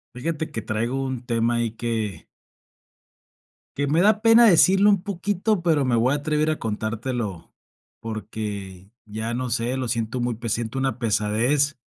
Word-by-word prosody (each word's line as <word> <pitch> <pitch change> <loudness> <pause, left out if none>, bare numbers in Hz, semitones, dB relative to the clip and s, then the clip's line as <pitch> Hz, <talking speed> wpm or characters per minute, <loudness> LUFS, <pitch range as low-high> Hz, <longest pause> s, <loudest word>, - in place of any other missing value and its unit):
Fíjate 160 +4 -3
que 115 - -4
traigo 115 +5 -2
un 130 -2 -4
tema 115 0 +1
ahí 115 -1 0
que 110 -7 -3 1.5
que 145 0 0
me 155 +4 +2
da 210 +2 +4
pena 230 +1 +7
decirlo 195 +1 +6
un 200 -3 +3
poquito, 200 0 -1
pero, 160 -5 +2
me 125 -2 +2
voy 120 +4 +2
a - - +1
atrever 150 +1 0
a 155 - -3
contártelo. 110 -3 -4 0.5
Porque, 105 -4 -6
ya 110 +2 -4
no 125 +1 -2
sé, 120 +2 -1
lo 130 -1 -2
siento 115 +1 -2
muy 120 -1 -1
pe 115 +1 -5
siento 115 +3 -2
una 135 -3 -1
pesadez 120 +7 +1
120 Hz, 160 wpm, -23 LUFS, 110-150 Hz, 1.5 s, pena